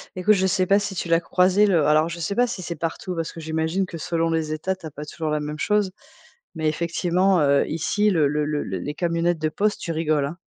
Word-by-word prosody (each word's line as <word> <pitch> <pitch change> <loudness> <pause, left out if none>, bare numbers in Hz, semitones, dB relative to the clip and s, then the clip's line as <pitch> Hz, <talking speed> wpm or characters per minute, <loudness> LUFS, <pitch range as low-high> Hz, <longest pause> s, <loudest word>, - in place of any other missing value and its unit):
Écoute, 185 +4 +3
je 190 0 +1
sais 185 0 +1
pas 195 +2 +4
si 200 -1 -4
tu 175 - -4
l'as 165 0 +4
croisé 185 +4 +3
le 175 -7 +3
alors 155 +2 +4
je 170 0 -6
sais 185 +5 -2
pas 245 0 +3
si 230 -5 -5
c'est 170 -1 -5
partout, 165 +3 -4
parce 165 -1 -3
que 165 - -10
j'imagine 160 +4 -1
que 175 - -8
selon 165 +1 -1
les 160 -1 -1
États, 185 +5 -2
tu 185 -3 -14
as 155 - -6
pas 150 +2 -8
toujours 155 +1 -4
la 150 0 0
même 150 0 -5
chose. 210 0 +1 0.6
Mais 155 -1 -1
effectivement, 175 +3 +1
heu, 140 -1 +3
ici, 190 +6 +1
le 160 -7 +3
le 150 +1 0
le 150 -1 -1
les 95 +10 -4
camionnettes 170 0 0
de 155 0 0
poste, 205 +6 0
tu 170 - -3
rigoles, 155 -3 +1
hein. 155 +5 -6
165 Hz, 250 wpm, -23 LUFS, 155-185 Hz, 0.6 s, pas